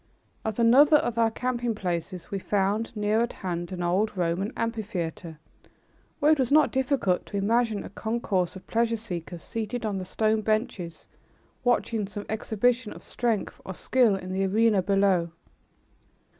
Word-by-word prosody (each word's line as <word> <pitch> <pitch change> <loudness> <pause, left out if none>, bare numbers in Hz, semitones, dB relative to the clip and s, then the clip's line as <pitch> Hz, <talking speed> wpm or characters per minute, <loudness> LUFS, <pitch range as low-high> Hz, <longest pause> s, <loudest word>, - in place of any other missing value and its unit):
At 220 -2 -3
another 265 +6 +6
of 235 -5 -1
our 225 -1 +4
camping 240 0 -2
places 180 -1 -4
we 200 - -2
found, 205 +3 0
near 210 +1 +1
at 240 - -1
hand, 175 0 -3
an 180 -1 -4
old 195 +4 +1
Roman 180 +4 0
amphitheater, 185 -8 -3 0.8
where 300 0 +4
it 310 - +3
was 260 -1 +1
not 305 +1 +5
difficult 260 -8 +1
to 200 - -4
imagine 220 +1 +1
a - - -8
concourse 205 -4 -1
of 190 - -10
pleasure 230 0 +1
seekers 175 -5 -6
seated 225 +1 -4
on 200 -3 -1
the - - -4
stone 215 +3 +1
benches 215 -6 -2 0.6
watching 230 -4 +1
some 205 0 -7
exhibition 225 +2 0
of - - -13
strength 230 -4 -2
or 190 - -7
skill 240 -2 +3
in 185 -1 -5
the 190 +1 0
arena 210 +1 +3
below. 195 -3 +2
210 Hz, 155 wpm, -27 LUFS, 190-230 Hz, 0.8 s, another